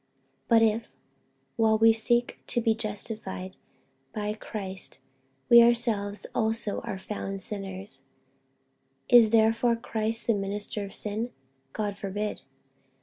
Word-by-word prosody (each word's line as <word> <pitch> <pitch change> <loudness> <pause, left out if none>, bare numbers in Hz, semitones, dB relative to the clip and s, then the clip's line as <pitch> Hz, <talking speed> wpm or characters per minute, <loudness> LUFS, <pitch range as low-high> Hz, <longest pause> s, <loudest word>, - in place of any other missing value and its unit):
48:002:017 - - -45 0.4
But 230 -1 +6
if, 225 +1 +1 0.7
while 220 -1 +4
we 225 +1 +6
seek 240 +2 0
to - - 0
be 225 -1 +3
justified 210 -3 -5 0.6
by 210 -1 -2
Christ, 195 -6 -7 0.5
we 235 -1 +9
ourselves 230 -4 +1
also 220 -2 -1
are 195 - -5
found 195 0 -5
sinners, 195 0 -7 1.1
is 240 -3 +8
therefore 225 +2 +3
Christ 225 0 -3
the 230 - +3
minister 205 +1 -3
of 200 - -8
sin? 215 +3 -3 0.4
God 205 -2 -3
forbid. 205 +2 -3
215 Hz, 120 wpm, -28 LUFS, 205-230 Hz, 1.1 s, we